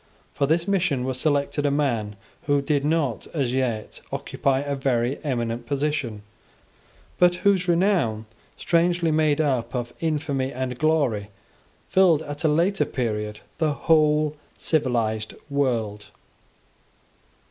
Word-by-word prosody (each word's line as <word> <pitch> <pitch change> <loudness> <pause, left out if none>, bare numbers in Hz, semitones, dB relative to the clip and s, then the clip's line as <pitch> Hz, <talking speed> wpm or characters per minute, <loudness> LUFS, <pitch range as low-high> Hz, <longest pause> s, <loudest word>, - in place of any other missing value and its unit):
For 140 - 0
this 165 +4 +1
mission 180 -10 +1
was 130 0 -3
selected 145 -1 0
a 145 - +3
man 120 -8 0 0.3
who 145 -1 +3
did 140 0 0
not 150 -6 0
as 130 -5 0
yet 120 -5 -2
occupy 135 -1 0
a 140 0 -2
very 130 -1 0
eminent 120 -4 -2
position, 140 -7 -2 1.0
but 180 0 +5
whose 190 -3 +3
renown, 170 - +2 0.3
strangely 170 -1 +2
made 155 -1 +2
up 130 -5 0
of 120 -1 -3
infamy 145 -4 -1
and 125 -1 -4
glory, 140 -10 +1 0.6
filled 175 -5 +4
at 145 0 -7
a - - +4
later 170 +6 +2
period 105 -4 -3 0.2
the 155 -3 +2
whole 150 0 +3 0.2
civilized 115 -8 0 0.2
world. 115 -7 -1
140 Hz, 125 wpm, -24 LUFS, 120-155 Hz, 1.0 s, but